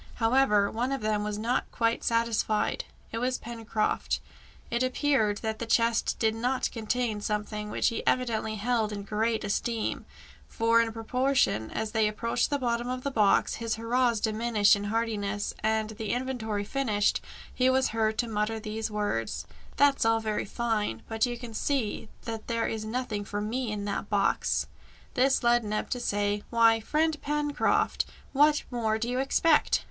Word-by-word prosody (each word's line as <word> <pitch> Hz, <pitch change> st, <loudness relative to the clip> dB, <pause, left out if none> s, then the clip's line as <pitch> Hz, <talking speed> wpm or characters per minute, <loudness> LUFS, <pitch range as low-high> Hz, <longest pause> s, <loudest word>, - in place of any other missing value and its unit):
However, 225 Hz, -4 st, +3 dB
one 245 Hz, +4 st, -1 dB
of 275 Hz, -, -2 dB
them 215 Hz, -1 st, 0 dB
was 210 Hz, 0 st, -3 dB
not 235 Hz, +4 st, -1 dB
quite 230 Hz, 0 st, 0 dB
satisfied: 230 Hz, -2 st, +1 dB, 0.3 s
it 225 Hz, -, -3 dB
was 250 Hz, +1 st, 0 dB
Pencroft. 225 Hz, -2 st, -2 dB, 0.5 s
It 235 Hz, +1 st, 0 dB
appeared 255 Hz, -5 st, +2 dB
that 220 Hz, -1 st, -2 dB
the 230 Hz, -, -4 dB
chest 230 Hz, 0 st, +2 dB
did 220 Hz, -1 st, +2 dB
not 250 Hz, +3 st, -1 dB
contain 225 Hz, -1 st, -1 dB
some 210 Hz, 0 st, -1 dB
thing 210 Hz, 0 st, -6 dB
which -, -, +1 dB
he 230 Hz, -, -3 dB
evidently 225 Hz, -3 st, +1 dB
held 220 Hz, 0 st, 0 dB
in 200 Hz, -1 st, -5 dB
great 220 Hz, +2 st, 0 dB
esteem, 225 Hz, +2 st, -2 dB, 0.4 s
for 230 Hz, +1 st, +3 dB
in 230 Hz, -1 st, -1 dB
proportion 230 Hz, -, +1 dB
as 220 Hz, -1 st, -3 dB
they 220 Hz, -1 st, +2 dB
approached 215 Hz, +2 st, 0 dB
the 290 Hz, -, +1 dB
bottom 240 Hz, -2 st, -1 dB
of 255 Hz, 0 st, -3 dB
the 280 Hz, -, -1 dB
box, 210 Hz, -6 st, +3 dB
his 230 Hz, -1 st, -1 dB
hurrahs 235 Hz, +1 st, +1 dB
diminished 220 Hz, -1 st, +3 dB
in 200 Hz, 0 st, -4 dB
heartiness, 210 Hz, -2 st, -1 dB
and, 220 Hz, 0 st, 0 dB
the 220 Hz, -1 st, -3 dB
inventory 240 Hz, -5 st, -2 dB
finished, 210 Hz, -3 st, +1 dB, 0.3 s
he 255 Hz, 0 st, +3 dB
was 260 Hz, 0 st, +3 dB
heard 220 Hz, -1 st, 0 dB
to 240 Hz, -, 0 dB
mutter 220 Hz, 0 st, -1 dB
these 220 Hz, +1 st, -4 dB
words 205 Hz, -, -2 dB, 0.3 s
"That's 285 Hz, -1 st, +4 dB
all 225 Hz, 0 st, +3 dB
very 215 Hz, -1 st, -2 dB
fine, 210 Hz, -, -2 dB
but 225 Hz, +2 st, +1 dB
you 240 Hz, 0 st, -4 dB
can 235 Hz, -2 st, -8 dB
see 225 Hz, -3 st, -1 dB
that 225 Hz, -1 st, -6 dB
there 230 Hz, -1 st, 0 dB
is 220 Hz, -1 st, -3 dB
nothing 220 Hz, -2 st, -3 dB
for 205 Hz, +1 st, -4 dB
me 225 Hz, +3 st, -2 dB
in 205 Hz, -1 st, -3 dB
that 200 Hz, 0 st, -3 dB
box!" 200 Hz, -2 st, +1 dB, 0.5 s
This 265 Hz, +1 st, +3 dB
led 240 Hz, 0 st, +4 dB
Neb 215 Hz, 0 st, -3 dB
to 250 Hz, -, -1 dB
say, 205 Hz, -2 st, 0 dB
"Why, 230 Hz, -1 st, +5 dB
friend 305 Hz, +5 st, 0 dB
Pencroft, 295 Hz, 0 st, +1 dB, 0.3 s
what 295 Hz, +2 st, +4 dB
more 220 Hz, -3 st, 0 dB
do 230 Hz, +2 st, -2 dB
you 250 Hz, +1 st, -1 dB
expect?" 300 Hz, +3 st, +3 dB
225 Hz, 170 wpm, -28 LUFS, 215-245 Hz, 0.5 s, Why